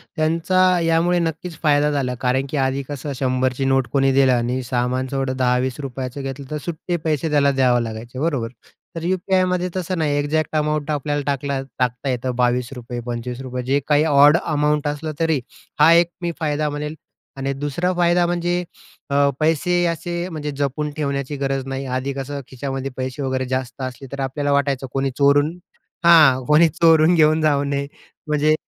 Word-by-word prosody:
त्यांचा 165 +3 +1 0.2
यामुळे 165 +1 +2
नक्कीच 165 0 -3
फायदा 150 -1 +3
झाला. 130 -3 -1
कारण 130 +1 +1
की 150 - -3
आधी 135 +1 -1
कसं 145 0 -5
100ची 130 0 0
नोट 135 -1 +2
कोणी 135 -1 +3
दिलं 135 -1 +4
आणि 125 +2 0
सामानचं 125 +2 -2
एवढं 135 -1 -1
₹10-20 130 +1 -2
घेतलं, 135 +1 -6
तर 150 - -2
सुट्टे 175 +1 -3
पैसे 155 +1 0
त्याला 140 -1 +4
द्यावे 125 -3 +2
लागायचे. 115 +3 -7
बरोबर? 140 -7 -1 0.5
तर 165 - -5
यू-पी-आयमध्ये 185 0 +1
तसं 185 0 -2
नाही. 150 -3 0
एक्झॅक्ट 155 +2 -1
अमाऊंट 150 0 0
आपल्या 145 0 -1
टाकला 140 -1 -1 0.2
टाकता 125 +2 -1
येतं 125 0 -2
₹22, 125 0 -1
₹25 125 +1 -5
जे 135 +3 +1
काही 150 0 +4
ऑड 145 +1 +6
अमाउंट 150 -1 +1
असलं 150 +2 -3
तरी, 160 -4 +2 0.4
हा 155 +2 +7
एक 170 0 +4
मी 170 0 -1
फायदा 150 -1 0
म्हणेल 150 +1 -4 0.4
आणि 135 0 -2
दुसरा 145 +6 -1
फायदा 175 0 +3
म्हणजे 175 +1 -1 0.5
अ, 140 0 +3
पैसे 165 +3 +2
असे 175 +1 -3
म्हणजे 150 -3 -4
जपून 145 +2 -1
ठेवण्याची 140 -1 -2
गरज 135 -1 -2
नाही. 135 0 -4
आधी 130 +2 -2
कसं 140 +1 -5
खिशामध्ये 135 +1 -5
पैसे 130 +2 -4
वगैरे 130 -1 -1
जास्त 130 0 -3
असले, 130 +1 -6
तर 140 - -6
आपल्याला 145 +2 -1
वाटायचं 140 -2 0
कोणी 135 0 0
चोरून 145 +4 +3 0.5
हां 150 -7 +7
कोणी 150 +4 +5
चोरून 160 +1 +4
घेऊन 155 0 +4
जाऊ 145 -2 +2
नये 140 0 -2 0.4
म्हणजे 150 0 +2
140 Hz, 165 wpm, -21 LUFS, 130-155 Hz, 0.5 s, हा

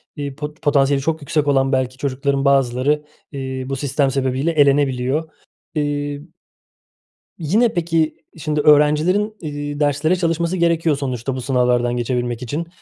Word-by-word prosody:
eee, 140 -3 -5
pot 150 +1 -7
potansiyeli 140 -2 +2
çok 160 +1 -1
yüksek 145 +1 -1
olan 135 -1 +2
belki 130 -1 0
çocukların 140 +1 -1
bazıları, 135 +2 +2 0.3
eee, 130 -2 -5
bu 135 - -1
sistem 135 0 0
sebebiyle 135 +3 0
elenebiliyor. 140 0 +2 0.5
Eee 145 -1 -2 1.2
yine 215 +9 +2
peki, 165 -2 0 0.2
şimdi 150 -1 -2
öğrencilerin, 155 +8 +3
eee, 145 -2 -5
derslere 145 +4 +2
çalışması 170 0 -1
gerekiyor, 170 -2 +2
sonuçta 130 -1 -3
bu 130 - -4
sınavlardan 125 -1 +1
geçebilmek 120 0 -2
için. 150 +7 -4
145 Hz, 130 wpm, -20 LUFS, 130-155 Hz, 1.2 s, öğrencilerin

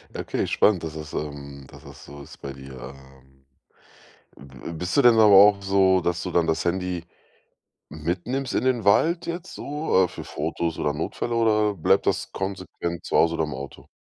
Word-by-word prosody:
Okay, - - -3
spannend, 95 -6 +2
dass 80 -1 -5
das, 75 -1 -8
ähm 70 -2 -6
dass - - -15
das - - -13
so 70 0 -11
ist 75 - -14
bei 70 -1 -6
dir, 65 -1 -11 0.2
ähm. 65 0 -21 0.9
Bi 65 -2 -14
bi 85 - -7
bist 90 +3 -3
du 140 - +5
denn 120 -1 +7
aber 110 - +7
auch 100 0 +7
so, 95 -1 +3
dass 85 0 -2
du 90 - -4
dann 85 -1 +2
das 80 0 -1
Handy 90 -1 -2 0.8
mitnimmst 90 - -3
in - - 0
den 125 -5 +1
Wald 165 - +3
jetzt 170 0 -6
so, 145 -10 0
äh, - - -2
für - - -9
Fotos 80 +2 -3
oder 75 - 0
Notfälle 100 +9 -3
oder 105 -2 +2
bleibt 80 - +2
das - - -1
konsequent 95 -3 -5
zu - - -1
Hause 85 0 +3
oder 80 - 0
im 75 - -6
Auto? 70 +1 -9
85 Hz, 195 wpm, -24 LUFS, 75-100 Hz, 0.9 s, denn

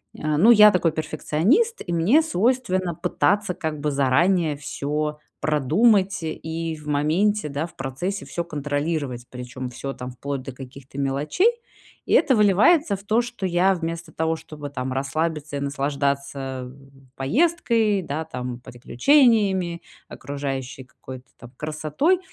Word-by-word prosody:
э, 155 -1 -1
ну 205 +9 +6
я 210 -2 +9
такой 180 -4 +2
перфекционист, 160 - 0
и 175 - -3
мне 205 - +4
свойственно 195 - 0
пытаться 205 +3 +1
как 160 -4 -4
бы 150 0 0
заранее 150 +4 +2
всё 150 +1 -3 0.2
продумать 190 - +3
и 160 0 -4
в 150 -1 -13
моменте, 160 +7 +1
да, 145 +2 -3
в 170 - -13
процессе 155 +10 -4
всё 170 - -3
контролировать, 145 -4 -3
причем 125 0 -7
всё 135 +3 -6
там 125 -1 -7
вплоть 140 +2 -5
до 135 - -7
каких-то 135 +1 -12
мелочей. 140 - +2 0.5
И - - -1
это 285 -5 +5
выливается 210 - +4
в 195 - -11
то, 220 +3 +2
что 240 -4 -5
я, 185 +2 +3
вместо 165 -1 -5
того, 160 +1 -1
чтобы 155 -2 -9
там 130 -2 -4
расслабиться 150 +2 -2
и - - -3
наслаждаться 140 -2 -2 0.5
поездкой, 225 - +1
да 160 -1 -4
там, 125 -5 -6
приключениями, 190 - +2 0.3
окружающей 135 -1 -5
какой-то 130 +1 -11
там 120 - -13
красотой, 155 - 0
155 Hz, 135 wpm, -23 LUFS, 140-195 Hz, 0.5 s, я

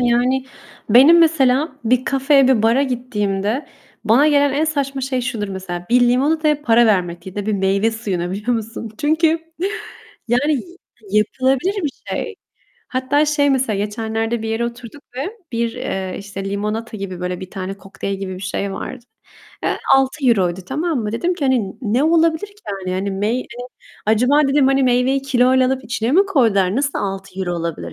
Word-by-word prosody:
Yani 250 +2 +2 0.5
benim 275 +9 +8
mesela 300 -3 +3
bir 250 +2 +2
kafeye, 275 0 +3
bir 235 -5 +3
bara 235 +5 +3
gittiğimde 230 -2 -2 0.4
bana 265 +8 +5
gelen 285 -1 +3
en 295 +3 +1
saçma 280 -3 -2
şey 260 -1 -1
şudur 230 -5 -3
mesela: 180 -2 -6
Bir 250 - +5
limonataya 295 +5 +2
para 235 -1 +4
vermek 175 -4 0
ya 190 - -8
da 205 0 -3
bir 215 - 0
meyve 195 +2 +1
suyuna, 190 -6 -3
biliyor 210 +6 -2
musun? 225 0 -6
Çünkü, 315 +3 +2 1.0
yani, 270 +6 +2
y 345 +6 -5 0.4
yapılabilir 260 - 0
bir 295 - -1 0.2
şey. 445 -3 -3 0.5
Hatta 270 +3 +1
şey 290 -1 +2
mesela, 255 -6 +1
geçenlerde 225 +2 -2
bir 220 - -3
yere 225 +1 -1
oturduk 235 +3 -8
ve 355 - -4 0.2
bir, 230 0 -1
eee, 190 -7 -4
işte, 200 -1 -7
limonata 215 +3 -3
gibi 185 -3 -6
böyle 180 0 -3
bir 185 - -8
tane 190 0 -5
kokteyl 195 0 -5
gibi 190 -1 -5
bir 185 - -9
şey 195 0 -3
vardı. 245 +4 -7 0.6
Eee, - - -1 0.2
€6, 240 - +2
tamam 305 +1 -1
mı? 210 -1 -3
Dedim 350 +9 0
ki, 315 - -3
hani, 250 -7 +1
"Ne 240 +6 +1
olabilir 330 +3 +2
ki 405 - -20 0.3
yani?" 185 - -1
Hani, 195 +1 -2
meyve 210 +6 -1 0.6
"Acaba" 250 +7 +4
dedim, 275 -1 +3
hani, 270 0 +3
"Meyveyi 255 +2 +2
kiloyla 255 -1 +3
alıp 260 -1 -1
içine 235 +2 -2
mi 390 +4 +5
koydular? 220 - +2
Nasıl 280 +1 0
€6 195 -2 -4
olabilir, 165 - -4
240 Hz, 170 wpm, -19 LUFS, 200-275 Hz, 1.0 s, benim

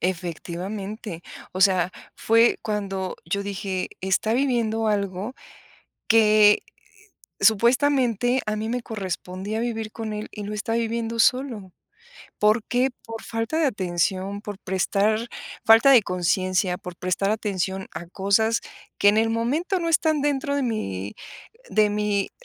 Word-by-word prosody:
Efectivamente, 185 +3 -4 0.3
o 185 - -5
sea, 185 -2 +4 0.2
fue 230 +1 +3
cuando 195 -3 -3
yo 200 +4 -2
dije 195 -2 -3
está 190 +3 +1
viviendo 230 -4 +1
algo, 200 +2 -1 0.7
que 215 -2 +5 0.8
supuestamente 245 +1 +3
a 215 0 -1
mí 215 +1 -3
me 245 +2 -2
correspondía 195 0 -4
vivir 225 -2 -3
con 220 -2 -5
él 210 0 -5
y 210 - -7
lo 205 +1 -5
está 215 +2 -3
viviendo 230 0 -2
solo, 235 -6 +1 0.7
¿por 215 +2 +3
qué? 250 +2 +1 0.2
¿Por 225 -1 -7
falta 225 +7 -2
de 325 - +3
atención? 190 -2 -1
Por 205 -2 -7
prestar 205 +4 0 0.4
falta 225 +4 +7
de 245 -5 +7
conciencia, 180 0 0
por 180 -1 -9
prestar 185 +3 -1
atención 195 -3 -2
a 170 - -6
cosas 200 +5 +1 0.4
que 205 - +4
en 210 - +2
el 225 +1 +3
momento 295 - 0
no 335 -1 -1
están 315 -2 +2
dentro 285 0 0
de 285 - 0
mi 100 - -3 0.6
de 215 -1 +4
mi 205 -1 0
215 Hz, 135 wpm, -24 LUFS, 190-230 Hz, 0.8 s, falta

